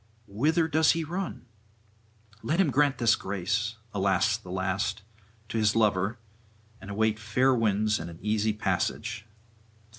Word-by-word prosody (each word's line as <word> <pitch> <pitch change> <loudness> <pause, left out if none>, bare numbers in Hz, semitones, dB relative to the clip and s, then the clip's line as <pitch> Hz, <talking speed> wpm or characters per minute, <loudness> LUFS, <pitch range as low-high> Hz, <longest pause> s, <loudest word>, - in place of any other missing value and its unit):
Whither 150 - +1
does 160 0 +4
he 165 -1 -2
run? 175 +1 -5 1.0
let 165 +4 -1
him 175 -7 +3
grant 145 0 +2
this 120 -1 +4
grace 100 +4 -2 0.2
alas, 100 +2 +2
the 105 -4 -10
last! 95 +3 -2 0.5
to 115 - -1
his 105 0 +2
lover, 105 0 +2 0.6
and 95 - -10
await 110 +1 0
fair 125 +5 +2
winds 105 -2 +1
and - - -6
an 85 - -10
easy 105 +1 0
passage. 105 0 -2
110 Hz, 140 wpm, -28 LUFS, 100-130 Hz, 1.0 s, does